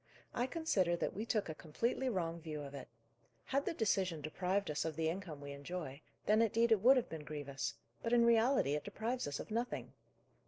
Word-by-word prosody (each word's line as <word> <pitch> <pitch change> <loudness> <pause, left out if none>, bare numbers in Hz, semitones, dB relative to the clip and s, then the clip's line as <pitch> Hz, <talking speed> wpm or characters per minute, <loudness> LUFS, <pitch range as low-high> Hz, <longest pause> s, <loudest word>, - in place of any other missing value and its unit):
I 245 +1 0
consider 215 - +1
that - - -1
we 215 +4 -4
took 215 -3 +1
a 160 - -3
completely 230 +12 -1
wrong 170 -6 -1
view 155 -2 -5
of 140 0 -8
it. 140 -2 -7 0.6
Had 275 +1 0
the - - +1
decision 190 - +1
deprived 180 +4 -1
us 150 - 0
of 160 -2 -3
the 160 0 +1
income 170 -4 -5
we 140 0 -7
enjoy, 140 0 -5 0.2
then 215 +2 +5
indeed 230 +1 +3
it 215 -4 +5
would 260 +5 +8
have 250 - +1
been 160 -2 -6
grievous; 140 -6 -4 0.3
but 230 - -2
in 235 -1 +6
reality 235 - +4
it 150 - -1
deprives 225 +3 -2
us 145 -1 -3
of - - -7
nothing. 235 +3 -2
185 Hz, 205 wpm, -36 LUFS, 150-230 Hz, 0.6 s, would